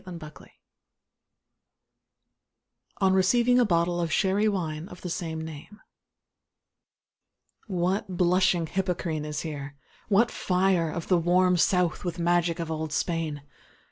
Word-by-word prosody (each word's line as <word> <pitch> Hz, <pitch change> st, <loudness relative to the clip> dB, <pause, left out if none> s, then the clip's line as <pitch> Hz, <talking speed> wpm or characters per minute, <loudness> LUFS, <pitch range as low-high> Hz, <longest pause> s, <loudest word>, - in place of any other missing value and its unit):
DON 180 Hz, -2 st, -8 dB
QUIXOTE 155 Hz, -2 st, -12 dB, 2.5 s
On 190 Hz, -1 st, +4 dB
receiving 240 Hz, +6 st, +3 dB
a 245 Hz, -, +4 dB
bottle 175 Hz, -2 st, +1 dB
of 165 Hz, -2 st, -2 dB
Sherry 200 Hz, +4 st, +2 dB
Wine 165 Hz, -5 st, -2 dB
of 180 Hz, -, -12 dB
the 180 Hz, -, -5 dB
same 160 Hz, -2 st, -4 dB
name 160 Hz, +6 st, -9 dB, 1.9 s
What 185 Hz, 0 st, -1 dB
"blushing 180 Hz, -1 st, +3 dB
Hippocrene" 175 Hz, -3 st, -2 dB
is 150 Hz, -1 st, -4 dB
here! 145 Hz, -3 st, -6 dB, 0.3 s
what 220 Hz, +3 st, +3 dB
fire 180 Hz, -2 st, +1 dB
Of 165 Hz, +1 st, -5 dB
the 180 Hz, -2 st, +3 dB
"warm 180 Hz, +2 st, +3 dB
South" 180 Hz, -1 st, +1 dB
with 175 Hz, -1 st, -3 dB
magic 175 Hz, -1 st, +1 dB
of 165 Hz, -1 st, -3 dB
old 160 Hz, -1 st, -3 dB
Spain! 155 Hz, -2 st, -2 dB
175 Hz, 125 wpm, -27 LUFS, 160-190 Hz, 2.5 s, On